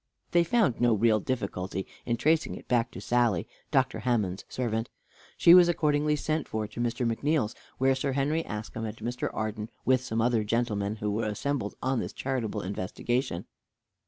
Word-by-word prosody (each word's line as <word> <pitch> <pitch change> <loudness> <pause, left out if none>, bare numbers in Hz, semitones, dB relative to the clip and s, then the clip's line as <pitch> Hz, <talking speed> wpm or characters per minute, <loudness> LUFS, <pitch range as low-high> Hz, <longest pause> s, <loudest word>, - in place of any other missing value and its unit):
They 170 0 +5
found 175 - +2
no 120 -2 +4
real 110 0 +3
difficulty 95 -5 -3 0.2
in 120 -1 +1
tracing 160 +4 +2
it - - -11
back 120 -2 +2
to - - -9
Sally, 120 -7 +1 0.2
Dr. 130 -1 +2
Hammond's 105 -6 0
servant. 115 -2 -2 0.5
She 170 - +8
was 175 -1 +8
accordingly 150 -2 +2
sent 155 +1 -1
for 110 -1 -2
to 105 +2 -9
Mr. 120 +1 0
McNeal's, 120 0 +1 0.2
where 135 +1 +3
Sir 135 +1 -1
Henry 145 +4 +1
Askham 110 0 -5
and 105 +1 -7
Mr. 120 +3 -3
Arden, 110 0 -3 0.2
with 130 -1 +4
some 115 -3 -2
other 115 -1 +2
gentlemen, 105 -2 -1
were 105 +2 -1
assembled 110 +1 -2
on 130 -1 +1
this - - -4
charitable 115 -6 -2
investigation. 100 +2 -2
120 Hz, 165 wpm, -28 LUFS, 110-135 Hz, 0.5 s, She